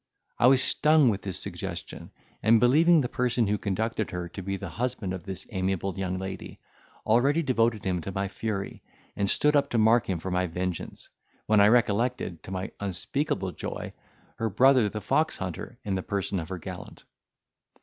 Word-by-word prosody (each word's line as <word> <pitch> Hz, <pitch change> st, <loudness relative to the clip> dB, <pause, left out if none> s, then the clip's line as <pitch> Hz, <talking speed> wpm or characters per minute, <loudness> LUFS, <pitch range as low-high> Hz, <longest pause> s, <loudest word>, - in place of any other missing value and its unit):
I 120 Hz, -, +6 dB
was 135 Hz, 0 st, +6 dB
stung 150 Hz, -3 st, +4 dB
with 100 Hz, -3 st, -1 dB
this 95 Hz, -4 st, -2 dB
suggestion, -, -, -5 dB, 0.3 s
and, 115 Hz, +1 st, +5 dB
believing 155 Hz, +7 st, +5 dB
the 125 Hz, -, -1 dB
person 120 Hz, -1 st, 0 dB
who 105 Hz, 0 st, 0 dB
conducted 110 Hz, +2 st, -2 dB
her 90 Hz, -1 st, -4 dB
to 95 Hz, -, -7 dB
be 95 Hz, +1 st, -3 dB
the 95 Hz, -, -6 dB
husband 105 Hz, 0 st, -3 dB
of 95 Hz, -, -7 dB
this 95 Hz, -2 st, -5 dB
amiable 95 Hz, -1 st, -1 dB
young 95 Hz, -1 st, -2 dB
lady, 95 Hz, 0 st, -7 dB, 0.5 s
already 140 Hz, +9 st, +3 dB
devoted 115 Hz, -5 st, +1 dB
him 90 Hz, -2 st, 0 dB
to 95 Hz, -, -5 dB
my 100 Hz, +1 st, -2 dB
fury, 100 Hz, 0 st, -4 dB, 0.3 s
and 100 Hz, -1 st, 0 dB
stood 150 Hz, 0 st, +3 dB
up 145 Hz, -, +3 dB
to 120 Hz, -, -1 dB
mark 110 Hz, 0 st, +4 dB
him 95 Hz, -, 0 dB
for 90 Hz, +3 st, -5 dB
my 90 Hz, 0 st, +1 dB
vengeance, 90 Hz, +1 st, -5 dB, 0.4 s
when 110 Hz, -1 st, +4 dB
I 100 Hz, -, +7 dB
recollected, 115 Hz, -4 st, +1 dB
to -, -, -11 dB
my 95 Hz, 0 st, -4 dB
unspeakable 100 Hz, -, -2 dB
joy, -, -, -6 dB, 0.4 s
her 115 Hz, -, -1 dB
brother 125 Hz, +1 st, +4 dB
the 105 Hz, +1 st, -5 dB
fox 155 Hz, +10 st, +1 dB
hunter, 95 Hz, +6 st, -6 dB
in 100 Hz, -, -1 dB
the 95 Hz, -, -1 dB
person 100 Hz, -1 st, -2 dB
of 80 Hz, -, -6 dB
her 95 Hz, -, -4 dB
gallant. 90 Hz, +1 st, -9 dB
100 Hz, 185 wpm, -27 LUFS, 95-120 Hz, 0.5 s, I